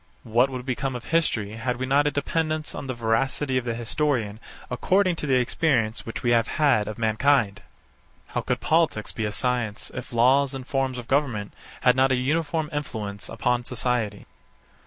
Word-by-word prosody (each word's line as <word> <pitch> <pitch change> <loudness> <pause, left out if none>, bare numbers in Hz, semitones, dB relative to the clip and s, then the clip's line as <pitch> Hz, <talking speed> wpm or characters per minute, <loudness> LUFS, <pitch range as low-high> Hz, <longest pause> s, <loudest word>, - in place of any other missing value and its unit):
What 120 +4 +3
would 130 -2 -6
become 130 0 -2
of 120 - -6
history, 135 -11 0
had 125 +2 -2
we 130 - -2
not 140 +3 +3
a - - +2
dependence 155 +1 -1
on 135 - -6
the 130 - -3
veracity 130 +4 0
of 125 - -9
the 115 -1 -1
historian 115 -3 -1 0.3
according 185 +8 +2
to 150 - -3
the 135 - +3
experience 120 -4 +1
which 115 - -5
we 120 - +2
have 115 -1 +3
had 130 -9 +2
of 110 - -5
mankind? 110 -1 +2 0.7
How - - -2
could - - -2
politics 160 -10 +1
be 110 - -3
a 105 - -1
science, 115 -1 -2
if - - -7
laws 130 +4 +3
and 130 -1 -6
forms 135 -1 -1
of 120 -2 -7
goverment 130 -8 0 0.3
had 125 -1 +5
not 130 +1 +3
a - - +4
uniform 155 +4 0
influence 110 -8 -4
upon 125 0 0
society? 120 -4 -2
125 Hz, 180 wpm, -25 LUFS, 115-140 Hz, 0.7 s, had